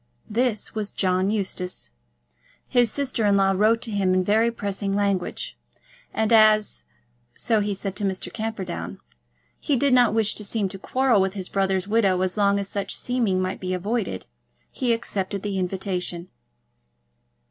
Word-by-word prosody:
This 230 -1 0
was 210 -2 -3
John 185 0 +1
Eustace. 190 - -3 0.8
His 245 -2 +3
sister 265 -5 -1
in 200 -1 +4
law 195 0 +4
wrote 220 +4 +3
to 230 - -3
him 195 -3 +1
in 185 - +2
very 220 +4 +3
pressing 200 -3 -3
language; 200 -3 -1 0.6
and 220 +1 +1
as, 215 -1 +4 0.5
so 225 -2 +1
he 205 -1 -1
said 195 0 -4
to 210 - -3
Mr. 190 -2 -2
Camperdown, 215 -6 -4 0.6
he 290 - 0
did 275 +1 +2
not 245 -3 +5
wish 220 -2 +2
to 210 - -6
seem 205 0 0
to 195 - -8
quarrel 255 -2 +2
with 190 +1 0
his 190 -2 -5
brother's 195 -1 0
widow 205 -4 +2
as 185 -1 0
long 200 -1 +3
as 200 -1 -2
such 200 -1 -3
seeming 235 -7 0
might 185 0 -2
be 185 0 -2
avoided, 195 - -2 0.5
he 250 -2 0
accepted 200 -4 -2
the 200 -2 -2
invitation. 180 -1 -3
200 Hz, 160 wpm, -24 LUFS, 190-225 Hz, 0.8 s, not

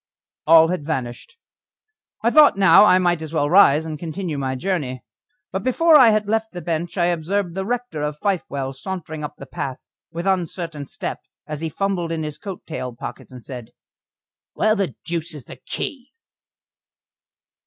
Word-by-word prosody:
All 165 0 +7
had 180 -4 -2
vanished. 130 - -5 0.9
I 235 - +3
thought 300 -7 +7
now 200 +1 +7
I 185 -3 +6
might 175 -3 +1
as 160 0 -7
well 145 -2 +1
rise 160 -5 +6
and 155 -2 -5
continue 170 0 -4
my 130 -1 -2
journey. 130 -5 -2 0.5
But 190 - -2
before 315 - +4
I 255 -6 +8
had 215 -1 +1
left 220 0 -1
the 175 - -6
bench 170 +2 -3
I 175 - +3
observed 175 +2 -1
the 190 +2 -3
rector 245 -9 -3
of 150 0 -2
Fifewell 140 -8 -2
sauntering 160 0 -6
up 150 - -6
the - - -9
path, 130 -2 -5 0.3
with 170 +2 -5
uncertain 170 -5 -2
step, 200 -1 -5 0.3
as 150 -1 -6
he 165 - -2
fumbled 185 -1 -2
in 160 -1 -2
his 150 -1 -6
coat 195 0 -7
tail 125 -6 -5
pockets, 120 - -8
and 125 -2 -11
said: 125 -4 -9 0.8
"Where 215 0 +2
the 195 -4 -2
deuce 170 -1 -3
is 140 -5 -10
the - - -11
key?" 265 -3 -5
170 Hz, 175 wpm, -22 LUFS, 150-195 Hz, 0.9 s, I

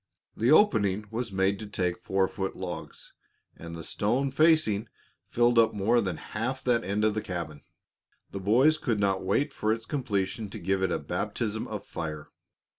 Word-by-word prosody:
The 115 +3 +1
opening 105 - +4
was 115 -1 -3
made 95 +1 +1
to 110 - -7
take 90 -3 -2
four 95 0 +1
foot 95 0 -4
logs, - - -7 0.4
and 85 0 -8
the 85 - -7
stone 125 - 0
facing 135 -8 +3 0.4
filled 120 0 +3
up 110 -1 +4
more 115 +4 +3
than 95 -6 -2
half 120 +9 -4
that 120 -2 +2
end 100 +3 -1
of 110 - +2
the 110 - -2
cabin. 85 -7 -5 0.7
The 100 - -5
boys 130 +11 +4
could 115 -7 -1
not 95 -2 +1
wait 140 +10 0
for 110 -4 0
its 115 0 -2
completion 105 -6 -2
to - - -7
give 95 +2 0
it 95 -2 +1
a - - +1
baptism 110 -1 -3
of - - -6
fire. 75 -2 -6
105 Hz, 180 wpm, -28 LUFS, 95-120 Hz, 0.7 s, opening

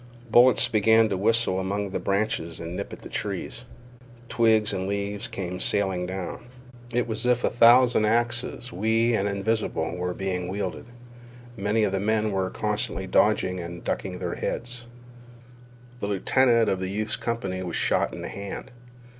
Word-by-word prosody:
Bullets 125 +2 +6
began 110 0 +4
to 100 - 0
whistle 110 -1 +2
among 100 +1 -2
the - - -2
branches 100 -5 -1
and 85 +1 -6
nip - - -5
at - - -10
the - - -7
trees. - - -4 0.6
Twigs 110 -2 +3
and 95 0 -2
leaves 100 +2 -2
came 90 -1 -5
sailing 95 -3 0
down. 95 +5 -6 0.4
It 120 0 0
was 110 -1 -2
as 125 0 +4
if 120 - -5
a - - +2
thousand 120 -1 +6
axes, 120 +2 -1
wee 115 +4 +2
and 100 -2 +1
invisible, 105 +1 -1
were 90 0 -3
being 90 -2 -2
wielded. 95 0 -4 0.7
Many 105 +1 +1
of 100 - +1
the 95 - 0
men 110 +1 +1
were 95 -1 0
constantly - - -2
dodging 90 0 +2
and 85 0 -7
ducking - - -3
their - - -3
heads. 120 0 -4 1.1
The 100 - -3
lieutenant 115 +4 +3
of 95 - 0
the 95 0 -3
youth's 105 +2 -1
company 100 -6 -3
was 90 -2 -4
shot - - +1
in - - -7
the - - -5
hand. 100 +6 -7
105 Hz, 165 wpm, -25 LUFS, 95-115 Hz, 1.1 s, Bullets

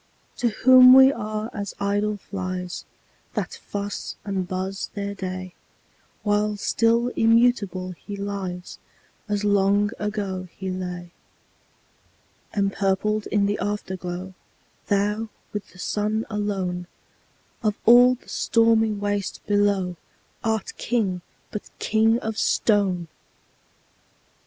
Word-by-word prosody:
To 240 - +2
whom 255 +3 +8
we 265 +1 +8
are 215 -1 -4
as 200 -1 -5
idle 205 +1 0
flies, 185 -2 -5 0.5
That - - -2
fuss 205 0 -4
and 190 -3 -2
buzz 190 +1 -3
their 200 0 -3
day; 185 -2 -5 0.7
While 210 0 +1
still 230 +3 +2
immutable 225 -6 +2
he 200 +3 -8
lies, 195 -3 -5 0.5
As 205 0 0
long 205 0 +3
ago 200 -3 -3
he 190 -1 -4
lay. 180 -1 -5 1.4
Empurpled 200 +1 0
in 205 -1 +2
the 205 +1 0
Afterglow, 190 -2 -4 0.5
Thou, 210 +2 0 0.2
with 210 -1 -5
the - - -18
Sun 215 +4 -1
alone, 190 -4 -2 0.7
Of 215 -3 +1
all 245 +2 +8
the 245 - -24
stormy 225 -1 +3
waste 205 -1 -3
below, 200 -3 +1 0.5
Art 220 -2 -1
King, 205 -6 0 0.3
but 210 - -6
king 225 +1 +3
of 220 -1 -3
stone! 195 -6 +2
205 Hz, 110 wpm, -24 LUFS, 190-215 Hz, 1.4 s, whom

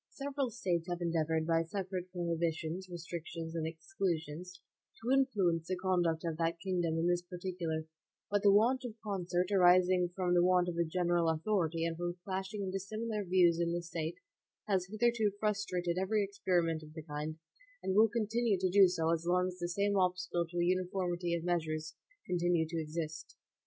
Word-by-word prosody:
(1) 280 0 -3
Several 275 -2 -1
States 180 -7 -1
have 175 0 -2
endeavored, 160 -2 0
by 165 0 +3
separate 185 +1 -4
prohibitions, 170 0 -2
restrictions, 170 -1 -6
and 160 -1 -2
exclusions, 170 - -3 0.4
to 235 +3 -2
influence 195 - +2
the 185 - 0
conduct 175 -3 +1
of 165 -2 -2
that 165 0 0
kingdom 175 -3 0
in 165 - +1
this 175 0 +2
particular, 175 -3 -4 0.5
but 205 -1 +2
the 200 - +6
want 235 +6 +4
of 235 -3 -6
concert, 180 -3 -1
arising 180 -1 +5
from 180 -2 +1
the 175 0 +5
want 180 0 +4
of 175 - -2
a 170 - +2
general 175 0 +1
authority 165 -1 0
and 165 -1 -2
from 175 0 -3
clashing 195 +2 -3
and 190 - -3
dissimilar 210 +3 -3
views 175 -2 +4
in 170 0 +1
the 175 0 -2
State, 165 0 -4 0.5
has 190 -3 +1
hitherto 220 -1 +2
frustrated 185 -5 -1
every 205 +2 +1
experiment 180 -5 0
of 155 0 -12
the 160 - -6
kind, 150 +1 -5 0.5
and 190 - 0
will 220 +2 +6
continue 225 -1 +1
to 185 -1 +1
do 195 0 +8
so 165 -2 +1
as 165 +1 -2
long 180 +1 +2
as 180 0 -10
the 175 0 -2
same 200 +3 +1
obstacles 180 -2 0
to 175 - -6
a 175 - +2
uniformity 180 -1 0
of 170 - -3
measures 155 -3 -1 0.3
continue 175 -2 +1
to 165 0 -2
exist. 155 0 -5
175 Hz, 180 wpm, -33 LUFS, 165-195 Hz, 0.5 s, do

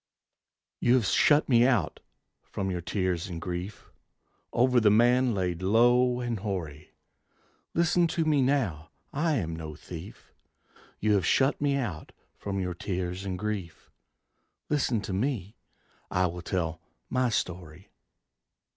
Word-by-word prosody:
You 120 - +4
have 125 -4 +2
shut 145 +9 +4
me 120 -3 +5
out 125 -5 +1 0.4
from 95 -1 -4
your 90 -1 -3
tears 90 0 -1
and 85 -3 -6
grief 90 +4 -6 0.6
Over 125 +1 +3
the 110 -2 +4
man 120 +2 +4
laid 90 -2 -2
low 120 +5 +4
and 120 -3 -2
hoary. 85 -8 -5 0.8
Listen 170 +1 +3
to 165 0 -1
me 150 -3 +3
now: 115 - 0 0.2
I 155 +2 +1
am 80 - -2
no 80 -2 -7
thief! 85 +4 -11 0.7
You 105 0 +2
have 95 -4 +2
shut 135 +2 +2
me 140 -1 +2
out 90 - -4 0.2
from 100 -1 -4
your 90 -1 -2
tears 90 +1 -4
and 95 -2 -3
grief, 100 -5 -5 0.8
Listen 130 -7 +1
to 100 - -5
me, 105 -1 -2 0.5
I 90 0 +1
will 90 0 -4
tell 85 -3 -2 0.3
my 130 -1 +1
story. 90 -4 -4
100 Hz, 140 wpm, -28 LUFS, 90-125 Hz, 0.8 s, me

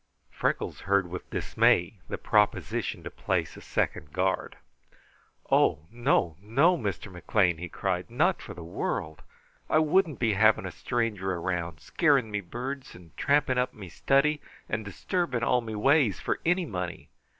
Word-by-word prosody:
Freckles - - -1
heard 100 -3 +2
with 90 - -7
dismay 90 +4 +2
the - - -3
proposition - - 0
to - - -6
place - - -2
a - - -11
second 75 -1 -2
guard. 95 +2 -1 0.9
"Oh! 75 - +3
no, 115 -9 +1
no, 135 - +3
Mr. 105 - -4
McLean," 90 -1 +1
he 90 0 -5
cried. - - -2
"Not - - +1
for - - -9
the 85 - -8
world! 80 -2 -3 0.5
I - - +4
wouldn't 155 0 +3
be 115 -3 +1
having 110 0 +4
a 95 - -4
stranger 105 0 -2
around, 85 -2 -3
scaring 140 -9 +2
me 105 0 -1
birds 130 +8 -6
and 85 -2 -16
tramping 140 -3 +2
up 125 - -1
me 95 -4 -9
study, 140 - +2 0.3
and 110 +1 -2
disturbing 125 - -2
all 125 +1 +3
me 110 -2 -6
ways, 135 - +3
for - - -2
any 175 +1 +2
money! 90 - -5
105 Hz, 155 wpm, -28 LUFS, 90-135 Hz, 0.9 s, I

